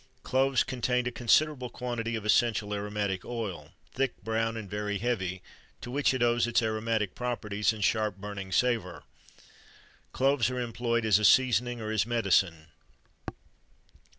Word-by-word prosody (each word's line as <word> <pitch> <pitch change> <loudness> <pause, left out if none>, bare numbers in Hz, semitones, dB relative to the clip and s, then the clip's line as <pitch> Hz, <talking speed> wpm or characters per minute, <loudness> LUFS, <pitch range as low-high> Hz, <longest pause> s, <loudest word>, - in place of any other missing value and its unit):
Cloves 135 0 +2
contain 125 -1 -1
a 125 - -1
considerable 125 +2 +2
quantity 120 -2 -3
of 110 -2 -5
essential 105 -1 +2
aromatic 100 -2 -2
oil, 95 -11 -5 0.2
thick, 135 +1 -1
brown, 115 +1 -1
and 110 -3 -6
very 105 +1 -3
heavy, 95 -6 -2 0.4
to 120 - -8
which 145 +2 +2
it 130 -2 0
owes 120 0 +2
its 120 0 +2
aromatic 110 -2 -1
properties 105 -5 -1
and 110 -2 -5
sharp 105 -2 +1
burning 100 -1 -7
savour. 110 -4 0 1.1
Cloves 135 -2 +2
are 125 0 -3
employed 115 -1 -1
as 105 -2 +4
a - - -3
seasoning 120 0 +4
or 110 -1 -4
as 110 -1 +1
medicine. 95 -8 +1
115 Hz, 145 wpm, -29 LUFS, 105-120 Hz, 1.1 s, as